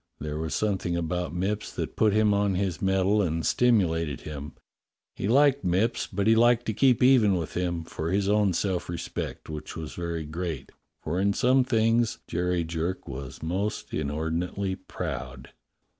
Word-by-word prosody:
There 75 +1 -4
was 80 0 -2
something 95 -5 0
about 85 0 -2
Mipps 100 +5 -2
that - - -4
put 110 -1 +3
him 105 0 +3
on 100 -1 +1
his 95 -2 -1
mettle 95 +2 +2
and 80 -3 -1
stimulated 85 - +2
him. 75 -1 -7 0.6
He - - -3
liked 140 +3 +4
Mipps, 95 +6 +1
but 100 0 -1
he 110 - +6
liked 120 +1 +4
to 110 - -1
keep 125 +1 +3
even 120 -7 +5
with 85 -3 -3
him, 85 -2 -1
for 80 0 -4
his 95 +2 +1
own 105 -2 +3
self 90 0 -1
respect, 85 -1 -5
which 75 -1 -7
was 80 -2 -6
very 85 -2 -4
great, 80 -3 -5 0.3
for 85 +4 -1
in 100 +1 +2
some 130 +4 +3
things 115 -1 +2
Jerry 90 0 0
Jerk 85 +3 -3
was 65 +1 -7
most 95 +6 -2
inordinately 80 +6 -2
proud. 65 -7 -6
90 Hz, 165 wpm, -27 LUFS, 80-105 Hz, 0.6 s, he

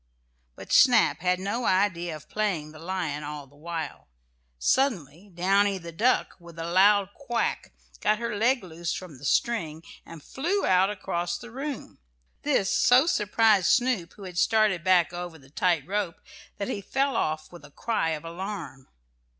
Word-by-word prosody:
But - - -11
Snap - - +5
had 180 +1 +1
no 205 +6 -2
idea 185 -3 +1
of 155 - -12
playing 185 -8 -2
the 155 - -13
lion 165 -4 -3
all 145 -1 -6
the 140 +1 -23
while. 165 +2 -6 0.5
Suddenly 180 - 0
Downy, 195 +3 +2
the 170 -2 -9
duck, 230 +10 +1
with 170 -1 -14
a 165 - -4
loud 200 +3 +4
quack, 240 -4 -2 0.3
got 215 0 +2
her 235 -1 -3
leg 240 +3 +2
loose 170 -1 -4
from 170 -8 -9
the 145 - -9
string 165 -6 0 0.2
and 165 -3 -12
flew 350 +9 -1
out 185 +1 +4
across 175 -3 -3
the 240 0 -11
room. 275 +2 -6 0.4
This 265 -10 +1
so 245 +4 +5
surprised 210 - +3
Snoop, 245 -9 +1
who 205 - -13
had 180 -2 -4
started 215 -6 +3
back 180 -2 +3
over 175 -2 -6
the 135 -2 -20
tight 170 -2 +1
rope, 195 -4 -2 0.4
that 200 - -3
he 200 - -3
fell 270 +6 0
off 155 -6 -2
with 175 -3 -12
a 145 - -13
cry 165 +1 -1
of 155 0 -4
alarm. 170 -6 -6
185 Hz, 165 wpm, -26 LUFS, 165-215 Hz, 0.5 s, Snap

